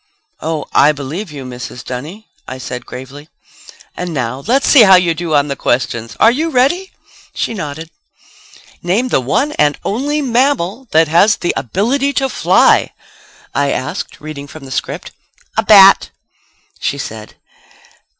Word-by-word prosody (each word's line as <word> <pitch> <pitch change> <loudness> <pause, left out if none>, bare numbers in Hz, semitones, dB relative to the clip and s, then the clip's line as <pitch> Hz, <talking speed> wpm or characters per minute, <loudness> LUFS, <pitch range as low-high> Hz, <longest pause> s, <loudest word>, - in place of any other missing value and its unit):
"Oh, 155 -2 -3
I 150 +2 +5
believe 150 +7 -6
you, 140 -3 -8
Mrs. 125 -1 -8
Dunny," 155 - -7 0.2
I 130 - -6
said 125 -1 -7
gravely. 135 +4 -10 0.7
"And 175 -2 -5
now, 130 +1 -3
let's 265 +3 +2
see 275 - +7
how 190 -3 +8
you 180 -2 +3
do 165 -1 -2
on 145 0 +3
the 140 - -3
questions. 115 -5 -2
Are 225 - +6
you 310 +7 -1
ready?" 320 +8 +1 0.4
She - - -2
nodded. 160 -4 -6 0.9
"Name 205 +9 0
the 135 - +1
one 260 - 0
and 150 -1 +3
only 285 +8 -1
mammal 255 -4 0
that 160 +1 +3
has 175 +7 +4
the 175 - -2
ability 255 - -1
to 270 0 0
fly," - - +3 0.6
I 140 0 +1
asked, 130 - -4
reading 150 -2 -8
from 145 0 -12
the 130 - -11
script. - - -4 0.4
"A 220 - +2
bat," 195 -3 +7 0.7
she 140 - -2
said. 110 -5 -8
165 Hz, 150 wpm, -15 LUFS, 140-230 Hz, 0.9 s, how